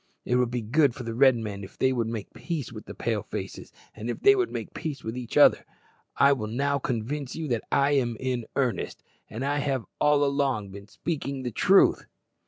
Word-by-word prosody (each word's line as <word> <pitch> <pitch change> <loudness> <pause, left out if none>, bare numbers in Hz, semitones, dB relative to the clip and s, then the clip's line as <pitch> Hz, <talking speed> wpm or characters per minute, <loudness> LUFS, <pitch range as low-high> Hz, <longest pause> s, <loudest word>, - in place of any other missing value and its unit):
It 125 - +2
would 125 -1 +2
be 120 -1 -3
good 135 +3 +3
for 130 - -7
the 115 -1 -4
Red 130 +1 +5
men 105 -3 -5
if 95 - -11
they 130 0 +2
would 115 -3 -1
make 115 -3 -5
peace 160 -7 -4
with - - -10
the - - -8
Pale - - -1
faces, - - -7 0.2
and 110 +2 -6
if 120 - -3
they 405 0 +6
would 375 -2 +1
make - - -5
peace 155 -4 -5
with 110 +1 -4
each 125 -2 -4
other. - - +6 0.5
I 140 0 +6
will 110 -6 -3
now 140 +5 0
convince 130 +3 -3
you 160 -1 -4
that 120 -3 -1
I 140 0 +3
am 120 -5 +1
in 125 -3 -2
earnest, 130 -4 -1 0.3
and 115 +4 -5
have 140 -3 -1
all 150 -1 +4
along 135 -8 0
been 100 +1 -10
speaking 140 0 -4
the 125 - -3
truth." 190 - +4
130 Hz, 210 wpm, -27 LUFS, 115-140 Hz, 0.5 s, they